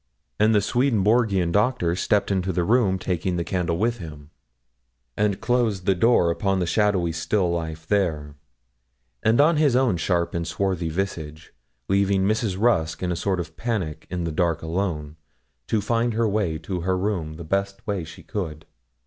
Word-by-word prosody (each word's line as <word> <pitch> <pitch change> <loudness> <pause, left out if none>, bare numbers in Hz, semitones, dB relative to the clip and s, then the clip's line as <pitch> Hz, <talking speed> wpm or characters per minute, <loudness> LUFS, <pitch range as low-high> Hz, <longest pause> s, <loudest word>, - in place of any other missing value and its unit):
And 110 +1 +4
the 105 - +4
Swedenborgian 110 -5 +2
Doctor 105 -4 +1
stepped 100 +2 +1
into 95 -1 0
the 90 0 0
room, 105 -2 +3
taking 90 -1 -2
the 85 - -1
candle 90 -2 -1
with 115 +4 0
him, 75 -3 -10 0.8
and 105 -2 0
closed 115 -7 0
the 95 - +4
door 90 -3 +3
upon 95 +3 0
the 90 - 0
shadowy 95 -2 +1
still 85 +3 0
life 80 -2 -4
there, 80 -7 0 0.9
and 110 +3 +3
on 155 +2 +5
his 145 -5 +3
own 125 -8 +3
sharp 85 0 0
and 85 -1 -2
swarthy 90 -1 -1
visage, 80 -3 -4 0.3
leaving 100 0 +2
Mrs. 105 -3 0
Rusk 95 -9 +1
in 90 - 0
a - - -1
sort 95 +1 -1
of 80 -2 -6
panic 95 -6 -3
in 90 -1 -3
the 85 - -2
dark 85 -1 0
alone, 80 -3 -3 0.5
to 110 - +1
find 115 +2 0
her 115 0 +2
way 100 -6 0
to 90 +1 -4
her 95 +2 0
room 90 -6 -2
the 85 - -8
best 100 +4 -2
way 100 -5 -2
she 80 - -11
could. 80 -7 -5
95 Hz, 175 wpm, -24 LUFS, 85-105 Hz, 0.9 s, on